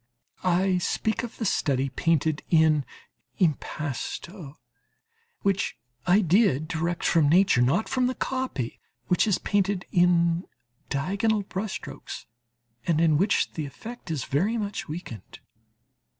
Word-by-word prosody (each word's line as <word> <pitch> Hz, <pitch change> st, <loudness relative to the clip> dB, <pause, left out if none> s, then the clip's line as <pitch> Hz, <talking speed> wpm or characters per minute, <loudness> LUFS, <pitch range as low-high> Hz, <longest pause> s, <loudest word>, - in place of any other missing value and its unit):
I 185 Hz, +1 st, +2 dB
speak 220 Hz, +4 st, -1 dB
of 240 Hz, -1 st, -7 dB
the 225 Hz, -, -3 dB
study 135 Hz, -7 st, +1 dB
painted 155 Hz, +2 st, +1 dB
in 155 Hz, -4 st, +4 dB, 0.5 s
impasto, 155 Hz, -, -3 dB, 0.9 s
which 195 Hz, 0 st, 0 dB, 0.3 s
I 190 Hz, +4 st, +5 dB
did 175 Hz, -, +3 dB
direct 170 Hz, +2 st, -2 dB
from 155 Hz, -4 st, +4 dB
nature, 180 Hz, -6 st, +5 dB
not 150 Hz, -, +2 dB
from 255 Hz, -1 st, +1 dB
the 255 Hz, -, -2 dB
copy, 255 Hz, -, -3 dB, 0.3 s
which 180 Hz, +4 st, +3 dB
is 205 Hz, -, +3 dB
painted 200 Hz, -2 st, 0 dB
in 175 Hz, 0 st, +3 dB, 0.4 s
diagonal 200 Hz, +9 st, 0 dB
brush 195 Hz, +2 st, -4 dB
strokes 210 Hz, -, -7 dB, 0.6 s
and 165 Hz, -3 st, +2 dB
in 165 Hz, -2 st, +4 dB
which 195 Hz, +3 st, +2 dB
the 155 Hz, -3 st, -4 dB
effect 220 Hz, -, -10 dB
is 150 Hz, -6 st, -2 dB
very 195 Hz, +12 st, +1 dB
much 205 Hz, -2 st, -3 dB
weakened. 150 Hz, -, -8 dB
175 Hz, 125 wpm, -26 LUFS, 155-200 Hz, 0.9 s, I